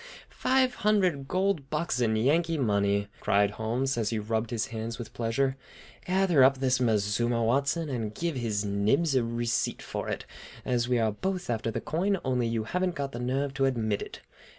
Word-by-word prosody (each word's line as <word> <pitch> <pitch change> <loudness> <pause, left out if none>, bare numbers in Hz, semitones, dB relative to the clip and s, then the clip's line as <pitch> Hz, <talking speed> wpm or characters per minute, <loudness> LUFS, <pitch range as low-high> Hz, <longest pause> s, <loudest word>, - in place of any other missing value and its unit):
Five 260 -1 +2
hundred 185 -10 +2
cold 185 -6 0
bucks 150 -4 -1
in 110 -2 +2
Yankee 160 +8 +2
money!" 100 -4 +1
cried 100 0 +2
Hemlock - - -13
Holmes, 120 +4 -1
as 110 -2 0
he 115 - -1
rubbed 110 +1 -1
his 115 -2 -1
hands 115 +1 -4
with 120 - -8
pleasure. 130 +4 0 0.5
"Gather 180 -6 +4
up 135 +1 +5
this 130 -1 +1
mazuma, 115 +1 +1
Watson, 140 +7 +1
and 115 -6 -3
give 165 +7 -3
His 110 -4 -1
Nibs 105 +11 +1
a 130 -2 +3
receipt 115 0 -1
for - - -4
it, - - -4 0.4
as 120 -1 0
we 125 - +3
are 110 -2 +2
both 185 - -3
after 115 0 -1
the 110 - -3
coin, 190 +5 0
only 125 -2 +1
you 115 -1 -1
haven't 180 +8 -1
got 140 -2 -3
the 120 - -6
nerve 135 +3 -1
to 135 0 +1
admit 110 -6 0
it. - - -8
125 Hz, 190 wpm, -28 LUFS, 110-150 Hz, 0.5 s, up